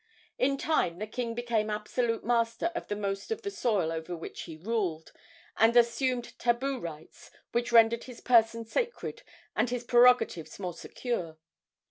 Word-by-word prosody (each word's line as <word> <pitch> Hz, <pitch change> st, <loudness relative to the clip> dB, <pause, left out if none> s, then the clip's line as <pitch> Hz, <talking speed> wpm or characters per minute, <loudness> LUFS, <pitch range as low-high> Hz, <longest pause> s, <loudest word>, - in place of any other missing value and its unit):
In 275 Hz, +1 st, +2 dB
time 270 Hz, -, +1 dB
the 210 Hz, -, -3 dB
king 230 Hz, +1 st, -4 dB
became 230 Hz, -3 st, 0 dB
absolute 225 Hz, +2 st, -1 dB
master 235 Hz, +7 st, +1 dB
of 345 Hz, -, -5 dB
the 205 Hz, -, -2 dB
most 200 Hz, -, -3 dB
of 450 Hz, 0 st, -3 dB
the 400 Hz, -, -3 dB
soil 205 Hz, -, 0 dB
over 165 Hz, +2 st, -4 dB
which 165 Hz, -, -7 dB
he 160 Hz, -, -9 dB
ruled, 180 Hz, -4 st, -2 dB, 0.5 s
and 225 Hz, +2 st, +5 dB
assumed 240 Hz, +1 st, +2 dB
tabu 250 Hz, +3 st, 0 dB
rights 160 Hz, -4 st, -9 dB, 0.2 s
which 240 Hz, +1 st, -1 dB
rendered 230 Hz, 0 st, +5 dB
his 250 Hz, -2 st, -10 dB
person 230 Hz, -1 st, +3 dB
sacred 475 Hz, -, -3 dB, 0.3 s
and 245 Hz, -, +1 dB
his 245 Hz, 0 st, -3 dB
prerogatives 240 Hz, -9 st, +4 dB
more 180 Hz, -3 st, -4 dB
secure. 170 Hz, -3 st, -4 dB
230 Hz, 155 wpm, -29 LUFS, 200-245 Hz, 0.5 s, and